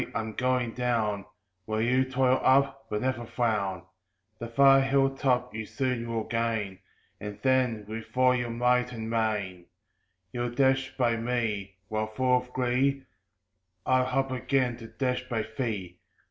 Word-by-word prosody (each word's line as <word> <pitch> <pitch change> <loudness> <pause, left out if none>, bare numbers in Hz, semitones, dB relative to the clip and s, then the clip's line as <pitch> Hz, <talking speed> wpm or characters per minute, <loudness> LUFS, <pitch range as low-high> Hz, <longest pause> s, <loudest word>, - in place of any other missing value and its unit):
I'm 110 -1 -2
going 125 0 0
down, 115 -5 -1 0.4
While 110 0 -1
you 130 +2 +3
toil 130 0 +2
up; 135 +1 +3
but 105 +2 -2
never 130 -2 -1
frown; 110 -6 -1 0.6
The 115 - -5
far 135 +3 +6
hill 135 0 +2
top 125 -2 0
you 110 -1 -5
soon 125 -4 -2
will 115 -1 -1
gain, 110 -4 -2 0.4
And 105 -1 -6
then, 130 -5 +2
with 110 +1 -6
all 130 0 +5
your 125 -1 -2
might 125 +1 +1
and 110 -1 -5
main, 105 -6 -1 0.6
You'll 120 +1 -2
dash 135 0 +2
by 120 -3 +2
me; 115 -5 -2
while, 110 +1 -1
full 125 +4 +1
of 125 0 -6
glee, 130 +2 +1 0.8
I'll 130 0 +2
up 135 -1 -1
again 130 -1 0
to 115 -2 -10
dash 125 +1 -2
by 110 -3 -1
thee! 100 -8 -3
120 Hz, 150 wpm, -28 LUFS, 110-130 Hz, 0.8 s, far